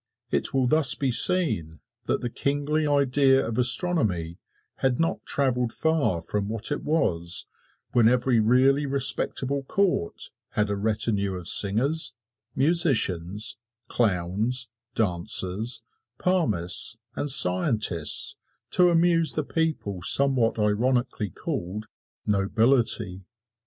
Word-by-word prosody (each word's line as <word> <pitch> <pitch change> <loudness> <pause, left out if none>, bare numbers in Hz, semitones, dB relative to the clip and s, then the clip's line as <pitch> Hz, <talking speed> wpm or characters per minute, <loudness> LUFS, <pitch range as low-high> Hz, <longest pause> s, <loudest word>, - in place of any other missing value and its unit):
It - - +1
will 135 -1 0
thus 140 0 +3
be 135 -2 -2
seen 110 - +2 0.3
that - - -2
the 120 - -4
kingly 145 +3 -2
idea 140 -1 +2
of 115 +1 -4
astronomy 120 - +1 0.4
had 130 -2 -1
not 165 0 -2
traveled 125 -4 -1
far 145 - -1
from 100 +4 -4
what 110 +3 -3
it 145 - -3
was 85 - 0 0.5
when 115 -2 +3
every 125 0 +1
really 130 +6 +2
respectable 140 0 +1
court 175 - -2 0.2
had 105 -1 -1
a - - -1
retinue 100 -2 -1
of 90 -2 -7
singers, 130 +11 +3 0.4
musicians, 110 - +1 0.3
clowns, 110 +4 -1 0.2
dancers, 100 +2 0 0.3
palmists 110 - 0 0.2
and 145 - -3
scientists 95 - +2 0.3
to 180 -1 +3
amuse 165 -2 +3
the 155 - -2
people 155 - -3
somewhat 130 +2 +3
ironically 115 +1 -1
called 95 +5 -6 0.4
"nobility." 110 -1 0
120 Hz, 110 wpm, -24 LUFS, 100-140 Hz, 0.5 s, thus